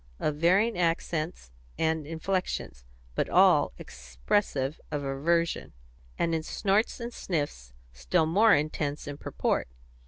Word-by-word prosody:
of 150 - 0
varying 190 +8 +3
accents 165 - -1 0.3
and 160 -2 0
inflections, 165 - -3 0.3
but - - -1
all - - +5
expressive 65 - -2
of 145 -1 -3
aversion, 165 +5 0 0.4
and 165 - 0
in 160 - 0
snorts 200 +8 0
and 235 0 -5
sniffs 145 - -3 0.2
still - - +1
more 205 +8 +5
intense 150 0 -2
in 145 - -4
purport. - - -1
160 Hz, 120 wpm, -28 LUFS, 140-175 Hz, 0.4 s, all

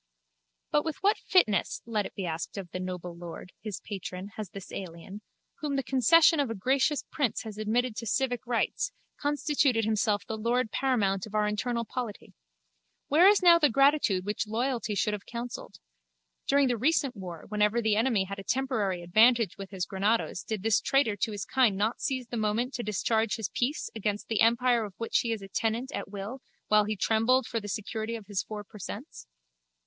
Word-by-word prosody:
But 295 - +3
with 320 +1 -3
what 410 +2 +3
fitness, 215 - +2
let 215 -3 -1
it - - -19
be 195 - -3
asked 165 +4 -4
of 185 -4 -6
the 185 - -4
noble 180 -1 -5
lord, 175 +1 -9
his 210 -3 -5
patron, 190 -1 -6
has 215 -2 -7
this 195 0 -10
alien, 190 +3 -8 0.4
whom 290 -2 -2
the 270 - 0
concession 305 +6 +5
of 280 -4 +1
a 225 - -3
gracious 265 +7 +1
prince 275 -8 -1
has 215 -2 -8
admitted 225 +2 0
to 230 - -4
civic 245 0 0
rights, 245 - 0 0.3
constituted 285 -5 +1
himself 215 -1 +1
the 220 -1 -5
lord 235 +1 0
paramount 210 -8 +1
of 215 - -9
our 210 0 +3
internal 235 +3 -1
polity? 235 -3 -6 0.8
Where 325 +6 +6
is 405 -2 +5
now 340 -1 +8
that 295 -7 +3
gratitude 275 -9 +3
which 210 +1 -2
loyalty 230 -1 -1
should 210 +1 +1
have 205 -1 -6
counselled? 240 0 -6 0.7
During 280 -1 +4
the 245 -2 0
recent 275 -1 +2
war 180 -5 -8
whenever 210 +2 +2
the 220 -2 +2
enemy 225 -3 +2
had 195 +1 -6
a - - -7
temporary 215 -9 -1
advantage 220 +3 +4
with 195 -1 -7
his 190 -3 -3
granados 200 -1 0
did 215 -1 -4
this 220 -2 +3
traitor 270 -6 +2
to 220 +3 -1
his 205 -1 -4
kind 245 -7 +3
not 215 +4 0
seize 260 -2 -1
that 240 - -5
moment 220 +4 0
to 240 - -3
discharge 220 +1 0
his 220 -3 -3
piece 265 +5 -2
against 210 -1 -3
the 225 -2 +1
empire 235 +1 +4
of 200 -3 -8
which 230 - +1
he 230 - -1
is 220 -3 -3
a - - -8
tenant 225 +6 -1
at - - -5
will 205 +6 -6 0.3
while 210 0 +5
he 215 +1 -2
trembled 225 +5 +2
for 230 - -2
the 205 - -8
security 220 +2 -3
of 220 -3 -8
his 200 -1 -1
four 210 -1 -7
per 210 +1 -14
cents? 205 - -8
220 Hz, 195 wpm, -29 LUFS, 205-255 Hz, 0.8 s, now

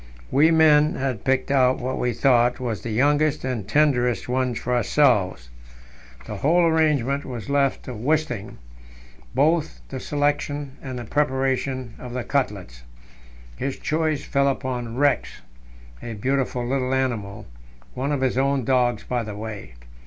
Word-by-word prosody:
We 150 +4 +5
men 155 -2 +5
had 130 -4 -3
picked 135 0 0
out 130 -2 +4
what 130 +1 -3
we 125 - 0
thought 120 0 +3
was 115 -6 -3
the 120 - -5
youngest 145 +5 +2
and 120 -7 -3
tenderest 125 -5 +2
one 125 -1 0
for 125 +2 -2
ourselves. 105 - +2 0.7
The 105 - -6
whole 165 - +3
arrangement 150 -4 +2
was 125 0 -6
left 140 -1 +1
to 130 - -7
Wisting, 125 -3 -2 0.8
both 150 - +1
the - - -5
selection 145 -1 -1
and 130 -2 -6
the 120 - -5
preparation 130 -3 -1
of 125 -1 -8
the 125 -1 -3
cutlets. 100 - -2 0.8
His 135 0 -3
choice 155 -2 -1
fell 140 -1 +1
upon 125 -4 -3
Rex, 145 -1 +1 0.6
a 115 - -6
beautiful 130 +2 -1
little 130 +1 0
animal 110 -5 -2 0.5
one 135 +3 -2
of 145 -2 -1
his 130 -1 +1
own 135 -2 +1
dogs, 125 -3 +1
by 125 -1 -2
the 105 -2 -6
way. 105 - -7
130 Hz, 145 wpm, -23 LUFS, 120-145 Hz, 0.8 s, We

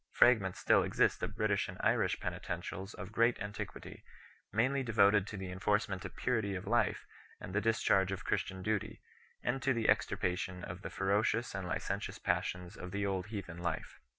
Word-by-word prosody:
Fragments 105 -7 +5
still - - +4
exist - - +2
of - - -3
British - - +1
and - - -7
Irish - - +2
penitentials 95 +3 -4
of 95 +2 -7
great 115 +2 +3
antiquity, 105 0 -6 0.5
mainly 130 +6 +2
devoted 105 -4 +4
to 105 - -6
the 95 -1 -5
enforcement 95 0 0
of - - -7
purity 110 -6 0
of 95 - -5
life 120 +3 +1 0.3
and 90 - -7
the 105 - +2
discharge 100 -4 +3
of 95 - -4
Christian 95 -1 -1
duty, 105 -1 -2 0.4
and 135 - 0
to 135 -2 +2
the 115 -1 0
extirpation 90 0 0
of 85 +2 -6
the - - -5
ferocious. 105 +4 +1
and 95 -2 -4
licentious 90 - -3
passions 90 +2 -1
of 90 - -7
the 100 +2 -1
old 95 -1 -1
heathen 95 -6 -6
life. 85 -2 -3
100 Hz, 175 wpm, -34 LUFS, 95-110 Hz, 0.5 s, Fragments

